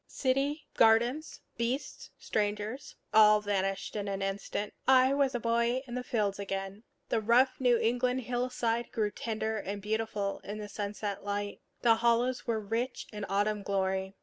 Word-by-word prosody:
City, 280 +3 0
gardens, 235 +7 +3 0.2
beasts, 240 +4 -3
strangers, 210 +4 -2 0.2
all 215 -1 +7
vanished 195 -1 -2
in 205 -1 -3
an 195 0 -2
instant. 200 +1 -3
I 260 0 +6
was 275 -2 +2
a - - 0
boy 235 +2 +1
in 240 - -9
the 250 0 -3
fields 205 -5 -1
again. 195 0 -4 0.3
The 225 - +1
rough 250 +4 +3
New 245 -2 +4
England 250 +3 +1
hillside 240 -1 -1
grew 210 -2 0
tender 220 0 -3
and 200 +1 -4
beautiful 210 -1 -2
in 210 +1 -6
sunset 205 -1 -4
light; 205 0 -3 0.2
the 230 -2 +5
hollows 240 +2 +1
were 225 -2 +1
rich 230 +5 -3
in 210 -1 -5
autumn 205 +1 +1
glory. 190 -1 -1
220 Hz, 150 wpm, -30 LUFS, 205-245 Hz, 0.3 s, all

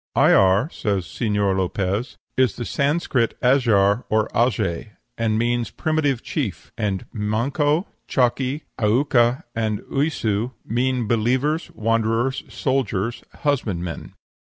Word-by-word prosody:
"Ayar," 95 +7 +5
says 100 -4 -1
Señor 105 -1 0
Lopez, 100 +4 -1 0.2
"is 130 -5 +2
the 120 - -5
Sanscrit 140 -4 0
Ajar, 115 -5 +3
or 110 0 +2
aje, 110 -5 0 0.2
and 110 -1 0
means 120 +1 0
primitive 155 -6 0
chief; 105 - -4
and 100 -4 -2
manco, 135 - 0 0.2
chaki, 130 +3 +1 0.2
aucca, 120 +3 +3
and 110 -2 -1
uyssu, 125 -5 0
mean 125 0 0
believers, 130 +8 +1
wanderers, 115 +3 +1
soldiers, 120 -5 -1 0.2
husbandmen. 95 - -2
115 Hz, 105 wpm, -22 LUFS, 105-130 Hz, 0.2 s, Ayar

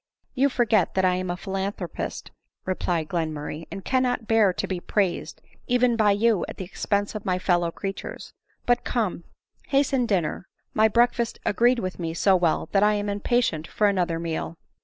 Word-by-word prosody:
" - - -48
You 275 +2 +3
forget 225 -8 +2
that 190 0 +3
I 180 - +3
am 185 0 -2
a 175 - -2
philanthropist," 195 -2 -4 0.3
replied 175 -3 -1
Glen 160 -1 -1
murray, 150 +1 -6
" - - -37
and 195 -1 -7
cannot 250 -3 +1
bear 220 -4 +4
to - - -3
be 185 -2 -3
praised, 190 0 -1 0.2
even 245 -1 +3
by 215 -2 +3
you, 205 -2 +2
at - - -8
the 190 - -5
expense 200 +2 -1
of 215 -2 -5
my 185 -4 0
fellow 175 -2 +1
qreatures. 195 +3 -6 0.3
But 245 0 +2
come, 205 -8 -2 0.4
hasten 270 -3 +2
dinner, 180 -3 -1 0.3
my 220 +1 +5
breakfast 235 +1 +2
agreed 240 +4 +3
with 185 -6 -4
me 165 -1 -3
so 190 +2 +4
well, 175 -3 +1
that 195 - +3
I 210 0 +4
am 205 0 -2
impatient 205 -6 0
for 210 - 0
another 180 -4 +1
meal. 165 0 -4
200 Hz, 185 wpm, -25 LUFS, 175-230 Hz, 0.4 s, my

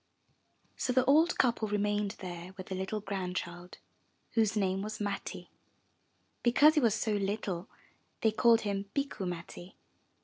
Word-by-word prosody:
So 250 - 0
the 255 0 +3
old 315 +6 +4
couple 235 -3 +2
remained 205 0 0
there 180 0 -7
with 185 0 -9
a - - 0
little 190 +3 -3
grand 190 -3 -4
child, 175 0 -6 0.5
whose 220 -2 +2
name 190 -1 +1
was 215 +2 -5
Matti. 205 -1 -4 0.9
Because 290 +6 +6
he 310 - +3
was 230 -6 +3
so 220 -1 0
little 200 -2 -2 0.5
they 220 - +4
called 230 +1 +5
him 200 -1 -3
Bikku 275 -9 -2
Matti. 175 +1 -7
205 Hz, 145 wpm, -31 LUFS, 190-230 Hz, 0.9 s, Because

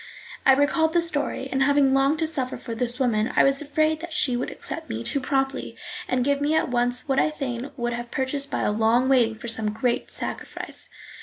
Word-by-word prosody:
I 270 - +9
recalled 315 +4 +2
the 345 - +4
story, 290 -4 0
and, 270 - 0
having 280 -1 +4
longed 275 +3 +3
to 325 - +1
suffer 270 -5 -1
for 230 - -7
this 240 +1 -2
woman, 230 -4 +1
I - - +6
was 275 +1 +3
afraid 310 +2 +1
that 340 +1 -8
she 260 -5 +1
would 245 - -2
accept - - -6
me 110 +1 -4
too 280 - 0
promptly 270 0 -2 0.3
and 255 -1 0
give 280 0 +1
me 300 +2 +1
at 315 - +1
once 245 +1 0
what 270 -1 +2
I - - +3
fain 270 -3 -4
would 240 -1 -2
have 240 0 -5
purchased 275 +2 -2
by - - -1
long 225 +4 +2
waiting 230 -4 +3
or - - -4
some 225 -2 +2
great 240 +2 -1
sacrifice. - - -5
265 Hz, 215 wpm, -24 LUFS, 240-285 Hz, 0.3 s, I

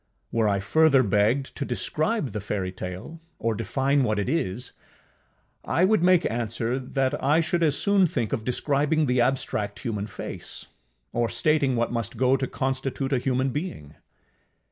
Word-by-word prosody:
Were 115 -2 +2
I 100 -1 +1
further 140 +6 +4
begged 110 +6 +1
to - - -2
describe 155 - -1
the 105 - -4
fairytale, 95 - -5 0.2
or 115 0 0
define 135 +5 +1
what 110 -4 0
it 105 - -1
is, 125 - -2 0.9
I 165 +7 +2
would 215 -1 +3
make 180 -1 +4
answer, 120 +2 -2
that 135 +2 -1
I 145 +4 +4
should 170 +1 0
as 150 -4 +2
soon 200 -2 +4
think 120 -7 -2
of 115 -5 -1
describing 145 +5 +1
the 125 -2 +2
abstract 110 -5 -1
human 105 -4 -3
face, 100 - -7 0.5
or 120 -1 +1
stating 140 +2 +2
what 115 0 0
must 115 -3 -3
go 130 +1 +4
to 135 -1 -1
constitute 135 +1 -2
a 130 - +2
human 130 +1 0
being. 145 - -5
130 Hz, 160 wpm, -25 LUFS, 115-145 Hz, 0.9 s, further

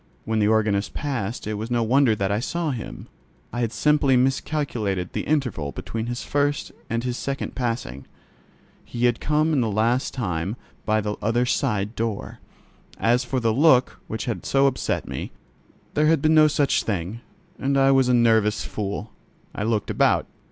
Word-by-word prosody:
When 110 0 0
the 105 - +3
organist 105 -3 +1
passed 125 -7 -3
it 105 -1 -3
was 110 +2 -4
no 120 -1 +1
wonder 125 0 +4
that 100 -1 -1
I 105 - +1
saw 165 +5 -2
him: 120 -4 -7 0.5
I 120 - -2
had 115 -2 0
simply 145 -2 +3
miscalculated 125 - -1
the - - -3
interval 125 - 0
between 110 - -5
his 120 +1 -4
first 145 0 0 0.2
and 115 +1 -1
his 125 -1 -2
second 135 0 -4
passing. 115 - -3 0.8
He 120 +1 -2
had 120 -1 +2
come 155 +1 +1
in 140 - +3
that 115 - +1
last 115 +5 +1
time 95 -4 -2 0.3
by 110 0 +2
the 105 0 -3
other 120 +3 +1
side 105 -5 0
door. 115 -3 -3 0.6
As 120 +2 +2
for 130 +1 -1
the 115 -2 +1
look 130 -1 +4
which 110 - -4
had 120 -3 -3
so 135 0 +3
upset 135 -2 0
me, - - -5 0.6
there 150 +1 +3
had 160 -1 +4
been 155 +3 +3
no 155 -1 +7
such 145 -2 +2
thing, 100 +2 -3 0.4
and 140 +1 +1
I 135 0 +5
was 135 -2 +4
a - - +4
nervous 110 -2 +3
fool. 105 +1 -4 0.4
I - - -5
looked 110 -1 0
about. - - +2
120 Hz, 180 wpm, -24 LUFS, 110-135 Hz, 0.8 s, no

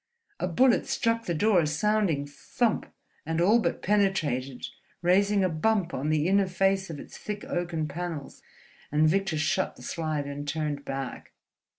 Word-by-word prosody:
A - - 0
bullet 245 +8 +3
struck 230 0 0
the 170 - -1
door 205 +2 +4
a 160 - +1
sounding 165 -2 +1
thump 210 - -2 0.3
and 160 +1 -2
all 205 +7 +5
but - - -1
penetrated, 155 -11 0 0.4
raising 200 +3 +3
a - - +4
bump 180 +2 0
on 140 +4 -2
the 155 +1 +2
inner 195 0 +3
face 190 +1 +1
of 155 -3 -6
its - - -11
thick 210 -1 -5
oaken 170 -3 -2
panels; 160 -1 -6 0.5
and 150 +2 +4
Victor 190 0 +1
shut 185 +6 0
the - - -14
slide 155 -3 -2
and 145 +1 -6
turned 150 -1 -2
back. 135 -1 -5
175 Hz, 165 wpm, -27 LUFS, 150-195 Hz, 0.5 s, all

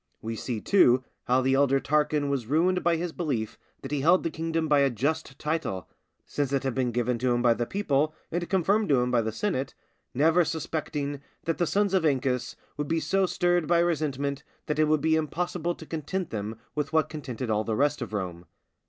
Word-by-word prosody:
We 115 +1 -4
see, 115 0 -3
too, 130 -10 +4 0.2
how 125 +1 +3
the 130 +1 +2
elder 135 0 +3
Tarquin 150 +1 +1
was 130 -5 -2
ruined 180 +6 +2
by 170 -1 +3
his 170 +1 -3
belief 120 -10 -3 0.2
that 135 - -6
he 145 -2 0
held 175 +6 +4
the 165 - -1
kingdom 165 0 -1
by 145 -1 +4
a 140 -1 +4
just 135 +4 -2
title, 150 - -2 0.4
since 145 -2 -2
it 140 -1 0
had 135 -2 -1
been 130 -1 0
given 120 0 0
him 120 -1 +1
by 120 -1 +5
the 115 +1 -3
people 155 -6 0 0.2
and 175 +1 -2
confirmed 200 +3 +2
to 135 -3 +4
him 125 0 0
by 120 -2 +3
the 110 0 -2
senate, 140 - -2 0.4
never 165 +6 +4
suspecting 150 -3 -3 0.2
that 165 +1 -2
the 175 - +2
sons 200 +1 +1
of 190 -3 +3
Ancus 130 -4 0 0.2
would 150 0 -2
be 165 +1 +1
so 195 +3 +1
stirred 175 -3 +1
by 170 - +4
resentment 145 -4 0 0.2
that 150 0 -2
it 155 - +5
would 155 -1 +2
be 160 +1 +3
impossible 175 +2 -1
to 160 - -11
content 165 +4 -4
them 110 0 -4 0.2
with 150 -1 -2
what 160 -1 +3
contented 130 -6 -5
all 105 0 +1
the 110 0 -2
rest 145 +3 +1
of 120 - -4
Rome. 90 -4 -4
145 Hz, 210 wpm, -27 LUFS, 125-165 Hz, 0.4 s, by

